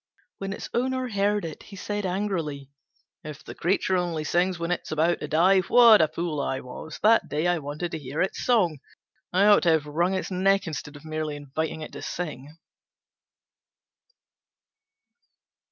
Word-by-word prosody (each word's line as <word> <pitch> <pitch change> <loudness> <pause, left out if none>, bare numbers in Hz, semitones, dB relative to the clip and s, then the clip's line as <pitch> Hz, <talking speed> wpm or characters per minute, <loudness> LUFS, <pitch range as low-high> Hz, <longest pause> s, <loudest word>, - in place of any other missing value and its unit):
When 195 0 -4
its 200 - -6
owner 255 +1 -1
heard 205 -1 0
it, 160 -2 -7
he 200 - -12
said 205 +1 -3
angrily, 170 -8 -3 0.5
"If 150 -1 -9
the - - -9
creature 190 +1 0
only 175 -3 -1
sings 180 +3 +1
when 170 +1 -3
it 180 - 0
is - - -10
about 160 +3 +1
to - - -5
die, 185 +5 +4
what 225 +2 +7
a 160 - +4
fool 160 -2 -3
I 135 -1 -2
was 130 +4 -9
that 225 +2 +5
day 150 +3 -1
I 175 -1 +2
wanted 150 +4 -5
to 160 - -4
hear 140 +1 -6
its 190 - -1
song! 185 - +2 0.5
I 190 +3 +3
ought 205 -1 +6
to 175 - +2
have 155 -2 +1
wrung 170 +6 0
its 190 - -3
neck 195 +2 +2
instead 150 -2 -6
of 145 - -13
merely 155 -1 -3
inviting 150 +3 -4
it 155 - -7
to - - -9
sing." 150 -3 -6
170 Hz, 175 wpm, -26 LUFS, 155-195 Hz, 0.5 s, what